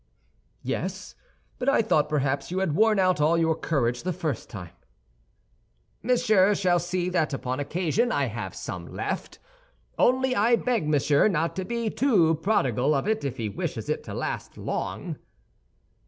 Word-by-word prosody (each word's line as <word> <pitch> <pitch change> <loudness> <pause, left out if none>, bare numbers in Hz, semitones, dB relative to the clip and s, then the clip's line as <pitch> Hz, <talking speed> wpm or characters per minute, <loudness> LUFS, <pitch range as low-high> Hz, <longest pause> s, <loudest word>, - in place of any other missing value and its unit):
"Yes, 185 +9 -4 0.5
but 260 - +1
I 275 - +3
thought 155 -9 +2
perhaps 140 -2 0
you 180 - -3
had 190 -5 0
worn 215 +4 +4
out 185 -4 +2
all 160 +3 +3
your 165 -1 +2
courage 125 -7 -1
the 185 - -2
first 155 -8 -3
time." 90 -4 -9 1.3
"Monsieur 215 -4 +3
shall 180 -3 +2
see 175 +1 -2
that 160 -5 0
upon 130 0 -3
occasion 175 - 0
I - - +1
have - - -5
some - - -6
left; - - -4 0.6
only 260 +1 +3
I 225 +4 +4
beg 230 -8 -1
Monsieur 145 +1 +3
not 165 -4 0
to 190 - -2
be 235 0 -2
too 195 - +3
prodigal 150 - +1
of 140 - -1
it 220 0 0
if 135 -2 -3
he 115 - -2
wishes 100 - -4
it - - -1
to - - -6
last - - -4
long." - - -4
175 Hz, 160 wpm, -26 LUFS, 145-215 Hz, 1.3 s, worn